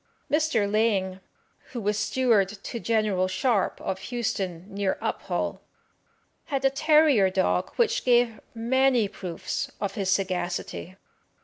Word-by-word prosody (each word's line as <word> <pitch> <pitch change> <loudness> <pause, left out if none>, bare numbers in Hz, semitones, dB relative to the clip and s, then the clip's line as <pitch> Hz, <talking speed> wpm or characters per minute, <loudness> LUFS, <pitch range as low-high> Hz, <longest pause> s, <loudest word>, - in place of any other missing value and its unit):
Mr. 300 -9 +2
Laing, 200 -3 +1 0.5
who 245 - -3
was 210 -1 0
steward 220 -3 +2
to 215 +3 -7
General 215 -5 +1
Sharp, 215 +1 0
of 190 - -3
Houston, 195 -8 -2
near 200 -1 -1
Uphall, - - -2 0.9
had 275 -2 -2
a 270 - +5
terrier 300 -8 +4
dog 185 0 0
which 475 +1 +1
gave 240 -2 +3 0.2
many 245 0 +2
proofs 180 -4 -5
of 200 -1 -2
his 195 -4 -2
sagacity. 185 -1 -2
215 Hz, 120 wpm, -26 LUFS, 190-255 Hz, 0.9 s, a